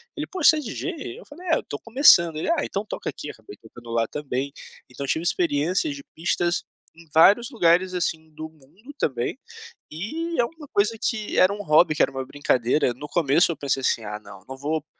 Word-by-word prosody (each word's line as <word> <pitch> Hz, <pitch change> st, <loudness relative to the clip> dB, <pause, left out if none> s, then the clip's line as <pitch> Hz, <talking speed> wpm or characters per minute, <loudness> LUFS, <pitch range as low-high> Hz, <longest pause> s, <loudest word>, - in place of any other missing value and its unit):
ele 300 Hz, -, -3 dB
"Poxa 370 Hz, -5 st, +4 dB
você -, -, -2 dB
é -, -, -1 dB
de 235 Hz, -7 st, -6 dB
DJ?" 370 Hz, +4 st, -5 dB
Eu -, -, -14 dB
falei: 350 Hz, +5 st, -12 dB
"É 320 Hz, -, +4 dB
eu -, -, -5 dB
tô 145 Hz, -, -6 dB
começando", 205 Hz, -, +5 dB
ele: 160 Hz, -, -2 dB
"Ah, 335 Hz, -3 st, +1 dB
então, 200 Hz, +2 st, -3 dB
toca -, -, -5 dB
aqui", 150 Hz, +1 st, -7 dB
acabei 110 Hz, -2 st, -12 dB
tocando 120 Hz, +1 st, -14 dB
lá 115 Hz, -1 st, +1 dB
também, 140 Hz, -1 st, -4 dB, 0.4 s
então 125 Hz, +3 st, -7 dB
eu -, -, -8 dB
tive 160 Hz, -, 0 dB
experiências 175 Hz, -, 0 dB
de 280 Hz, -, -10 dB
pistas 175 Hz, +1 st, 0 dB, 0.3 s
em 165 Hz, -1 st, -17 dB
vários 205 Hz, +9 st, +6 dB
lugares 180 Hz, -3 st, +3 dB
assim 160 Hz, -3 st, -2 dB
do 155 Hz, +1 st, -8 dB
mundo, 160 Hz, -, -17 dB
também, 125 Hz, -, -2 dB, 0.5 s
e 315 Hz, -, -4 dB
é -, -, +4 dB
uma 305 Hz, +1 st, -9 dB
coisa 210 Hz, +3 st, +1 dB
que 215 Hz, -4 st, -2 dB
era 185 Hz, +2 st, +5 dB
um 205 Hz, -, -6 dB
hobby, 155 Hz, -1 st, +4 dB
que -, -, +3 dB
era -, -, +2 dB
uma 135 Hz, 0 st, -4 dB
brincadeira, 130 Hz, -1 st, +1 dB
no 150 Hz, +4 st, -9 dB
começo 165 Hz, +1 st, +3 dB
eu -, -, -7 dB
pensei 135 Hz, -1 st, -1 dB
assim: 115 Hz, -3 st, 0 dB
"Ah 105 Hz, 0 st, -5 dB
não, 95 Hz, -2 st, -14 dB
não 135 Hz, -, -7 dB
vou, 150 Hz, +2 st, -2 dB
165 Hz, 220 wpm, -24 LUFS, 140-230 Hz, 0.5 s, vários